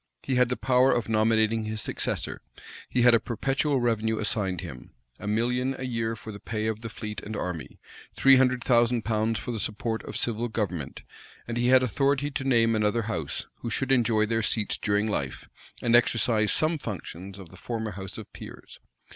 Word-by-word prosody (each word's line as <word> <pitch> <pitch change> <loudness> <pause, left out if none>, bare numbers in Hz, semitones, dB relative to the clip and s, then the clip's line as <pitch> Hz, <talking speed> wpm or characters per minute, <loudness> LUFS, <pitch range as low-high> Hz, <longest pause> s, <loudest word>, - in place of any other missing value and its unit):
He 135 - -2
had 125 -1 +3
the 125 - -1
power 130 0 +4
of 120 -2 0
nominating 110 0 +2
his 110 0 -3
successor; - - -2 0.5
he 125 - +2
had 120 -1 +7
a 115 - +6
perpetual 135 +5 0
revenue 110 -2 +1
assigned 100 -5 -1
him, 65 +1 -10 0.2
a 105 - -7
million 125 +5 0
a 130 - -5
year 115 -2 -2
for 110 0 -9
the 100 - -9
pay 110 0 -3
of 110 0 -2
the 115 - -5
fleet 105 0 -6
and 110 - -6
army, 90 -5 -5 0.4
three 135 0 +6
hundred 125 -1 +2
thousand 120 -1 +3
pounds 110 0 +1
for 125 - -4
the 115 - -3
support 110 +2 -2
of - - -5
civil 120 0 0
government; 100 - -3 0.4
and 115 - -3
he 120 +1 +1
had 130 0 +6
authority 140 +3 +1
to 135 - -3
name 115 -4 +3
another 110 +2 +1
house, 85 -10 -3
who 120 - -5
should 135 +4 -1
enjoy 115 -4 +3
their 115 +1 0
seats 110 -1 0
during 105 +1 0
life, 70 -11 -3 0.4
and 120 0 +4
exercise 115 -2 +3
some 155 0 +2
functions 95 -4 -7
of 95 -4 -11
the 90 - -14
former 110 +2 -4
house 95 -1 -7
of - - -10
peers. - - -11
115 Hz, 195 wpm, -27 LUFS, 105-125 Hz, 0.5 s, had